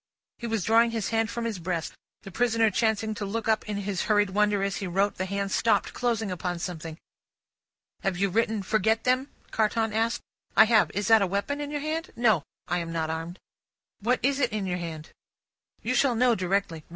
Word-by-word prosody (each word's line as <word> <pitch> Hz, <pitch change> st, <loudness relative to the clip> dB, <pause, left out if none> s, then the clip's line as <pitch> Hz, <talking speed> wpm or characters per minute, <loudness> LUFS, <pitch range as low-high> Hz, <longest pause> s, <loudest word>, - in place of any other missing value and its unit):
'" -, -, -65 dB
He 235 Hz, -, -4 dB
was 225 Hz, -4 st, -1 dB
drawing 230 Hz, +3 st, +4 dB
his 225 Hz, -2 st, -2 dB
hand 225 Hz, 0 st, +1 dB
from 235 Hz, 0 st, -3 dB
his 220 Hz, -5 st, -3 dB
breast; 170 Hz, -1 st, -3 dB, 0.3 s
the 195 Hz, -, -9 dB
prisoner 230 Hz, +1 st, +2 dB
chancing 220 Hz, +1 st, +1 dB
to 210 Hz, -, -5 dB
look 220 Hz, +3 st, -3 dB
up 220 Hz, -1 st, +1 dB
in 205 Hz, -, -2 dB
his 200 Hz, -2 st, -2 dB
hurried 205 Hz, -2 st, +3 dB
wonder 205 Hz, 0 st, +2 dB
as 195 Hz, 0 st, -1 dB
he 195 Hz, -, -4 dB
wrote, 195 Hz, +3 st, 0 dB
the 185 Hz, -, -2 dB
hand 200 Hz, 0 st, -2 dB
stopped, 225 Hz, -, +2 dB
closing 225 Hz, -4 st, -1 dB
upon 180 Hz, 0 st, -3 dB
something. 165 Hz, -2 st, -6 dB, 1.0 s
"Have 190 Hz, -2 st, -1 dB
you 200 Hz, +1 st, +1 dB
written 220 Hz, 0 st, +1 dB
'forget 220 Hz, +2 st, +1 dB
them'?" 255 Hz, +2 st, +1 dB, 0.2 s
Carton 220 Hz, 0 st, +1 dB
asked. 225 Hz, +2 st, 0 dB, 0.4 s
"I 220 Hz, -, +9 dB
have. 220 Hz, -1 st, +4 dB
Is 205 Hz, -1 st, -1 dB
that 225 Hz, -1 st, +7 dB
a 195 Hz, -, +2 dB
weapon 200 Hz, +10 st, -2 dB
in 290 Hz, -, -4 dB
your 295 Hz, -1 st, -3 dB
hand?" 320 Hz, +3 st, -3 dB
"No; 220 Hz, -8 st, +3 dB, 0.3 s
I 175 Hz, -, 0 dB
am 165 Hz, -1 st, -4 dB
not 160 Hz, -1 st, -1 dB
armed." 165 Hz, +3 st, -5 dB, 0.6 s
"What 245 Hz, +5 st, +1 dB
is 275 Hz, +1 st, +2 dB
it 270 Hz, -, +1 dB
in 210 Hz, -2 st, -2 dB
your 180 Hz, -1 st, -2 dB
hand?" 160 Hz, -2 st, -7 dB, 0.7 s
"You 250 Hz, -, 0 dB
shall 255 Hz, -1 st, +3 dB
know 245 Hz, +1 st, +4 dB
directly. 185 Hz, -4 st, -1 dB
210 Hz, 210 wpm, -27 LUFS, 185-230 Hz, 1.0 s, I